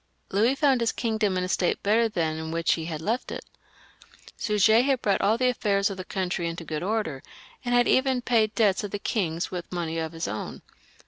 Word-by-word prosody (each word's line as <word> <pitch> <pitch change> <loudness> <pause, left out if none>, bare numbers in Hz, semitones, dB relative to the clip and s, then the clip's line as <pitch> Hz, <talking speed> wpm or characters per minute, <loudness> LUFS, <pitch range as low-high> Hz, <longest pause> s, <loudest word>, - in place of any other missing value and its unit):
Louis 225 +7 +3
found 275 -4 +3
his 230 - +2
kingdom 220 -5 0
in 180 - 0
a - - -2
state 180 0 0
better 225 +3 +3
than 160 -6 -1
that - - -4
in 160 - -5
which 165 0 +2
he 160 - -3
had 160 -2 -5
left 230 +6 -1
it. - - -6 0.9
Suger 220 +1 +4
had 265 -1 +1
brought 200 -2 +2
all 215 +3 +3
the 255 +1 +2
affairs 200 -4 +1
of 195 - -6
the 185 - -5
country 180 -2 -2
into 165 0 -6
good 155 -2 -4
order, 190 -8 -2 0.4
and 245 -1 0
had 245 0 +4
even 260 -2 +2
paid 220 -3 +2
debts 210 -3 +2
of 205 - -3
the 205 - -3
king's 175 -5 -2
with 175 -2 -6
money 165 -2 -2
of 160 0 -4
his 165 - -3
own. 105 +2 -5
200 Hz, 220 wpm, -26 LUFS, 170-230 Hz, 0.9 s, Suger